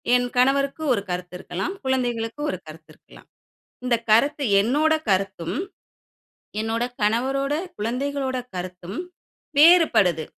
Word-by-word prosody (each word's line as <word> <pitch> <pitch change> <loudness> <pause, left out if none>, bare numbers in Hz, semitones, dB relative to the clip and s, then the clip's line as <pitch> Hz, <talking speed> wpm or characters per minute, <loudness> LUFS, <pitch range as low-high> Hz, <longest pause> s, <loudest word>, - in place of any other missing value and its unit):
என் 245 0 +2
கணவருக்கு 275 +4 +2
ஒரு 200 - -1
கருத்து 180 0 -4
இருக்கலாம். 360 - -4
குழந்தைகளுக்கு 245 -1 -1
ஒரு 185 - -2
கருத்து 155 +1 -12
இருக்கலாம். - - -19 0.6
இந்த 245 -2 +2
கருத்து 280 +7 +3 0.2
என்னோட 300 +8 +2 0.2
கருத்தும், 190 -2 0 1.1
என்னோட 225 +2 -1 0.2
கணவரோட, 265 +6 +1 0.2
குழந்தைகளோட 260 +4 -2 0.2
கருத்தும் 180 - -6 0.6
வேறுபடுது. 295 - +5
240 Hz, 105 wpm, -23 LUFS, 190-275 Hz, 1.1 s, வேறுபடுது